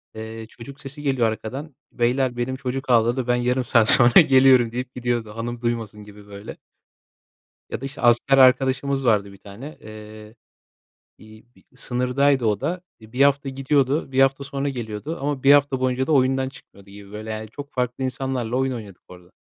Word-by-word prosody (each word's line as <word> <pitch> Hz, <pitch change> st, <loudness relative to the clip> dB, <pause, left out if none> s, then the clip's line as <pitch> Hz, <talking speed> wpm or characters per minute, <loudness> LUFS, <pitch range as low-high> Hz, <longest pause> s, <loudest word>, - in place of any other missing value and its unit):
Eee, 110 Hz, 0 st, -8 dB
çocuk 140 Hz, +4 st, -12 dB
sesi 145 Hz, +1 st, -10 dB
geliyor 130 Hz, -5 st, +1 dB
arkadan. 135 Hz, +6 st, -7 dB, 0.2 s
Beyler 120 Hz, +1 st, 0 dB
benim 125 Hz, +2 st, -2 dB
çocuk 130 Hz, +1 st, -5 dB
ağladı, 120 Hz, +1 st, +2 dB
ben 125 Hz, -, +2 dB
yarım 125 Hz, +1 st, 0 dB
saat 115 Hz, -2 st, +3 dB
sonra 120 Hz, 0 st, +7 dB
geliyorum 130 Hz, -3 st, +4 dB
deyip 125 Hz, +1 st, -6 dB
gidiyordu. 120 Hz, -3 st, -2 dB
Hanım 120 Hz, +1 st, -5 dB
duymasın 115 Hz, -3 st, -4 dB
gibi, 105 Hz, 0 st, -15 dB
böyle. 100 Hz, 0 st, -10 dB, 1.1 s
Ya -, -, -5 dB
da, -, -, -5 dB
işte, 140 Hz, +1 st, -8 dB
asker 120 Hz, +3 st, +3 dB
arkadaşımız 135 Hz, +1 st, +3 dB
vardı 100 Hz, -3 st, +1 dB
1 -, -, -15 dB
tane. 110 Hz, +11 st, -11 dB
Eee, 110 Hz, 0 st, -12 dB, 0.8 s
bir 110 Hz, 0 st, -16 dB
bir -, -, -24 dB
sınırdaydı 125 Hz, +1 st, 0 dB
o 105 Hz, -2 st, 0 dB
da. 180 Hz, +1 st, -3 dB, 0.2 s
Eee, 110 Hz, 0 st, -16 dB
1 130 Hz, +2 st, -2 dB
hafta 140 Hz, -1 st, +2 dB
gidiyordu, 135 Hz, +1 st, 0 dB
1 135 Hz, +1 st, +2 dB
hafta 135 Hz, +1 st, +2 dB
sonra 140 Hz, 0 st, -3 dB
geliyordu 120 Hz, +5 st, -6 dB
ama 140 Hz, -2 st, -3 dB
1 140 Hz, +1 st, +7 dB
hafta 140 Hz, -2 st, +2 dB
boyunca 130 Hz, +1 st, -1 dB
da -, -, -1 dB
oyundan 130 Hz, -1 st, +2 dB
çıkmıyordu 100 Hz, -7 st, -18 dB
gibi, 100 Hz, 0 st, -13 dB
böyle. 110 Hz, +1 st, -8 dB
Yani, 110 Hz, 0 st, -6 dB
çok 145 Hz, +4 st, -10 dB
farklı 125 Hz, 0 st, -3 dB
insanlarla 130 Hz, -2 st, -3 dB
oyun 130 Hz, 0 st, 0 dB
oynadık 105 Hz, -6 st, -10 dB
orada. 90 Hz, 0 st, -16 dB
125 Hz, 180 wpm, -22 LUFS, 110-135 Hz, 1.1 s, sonra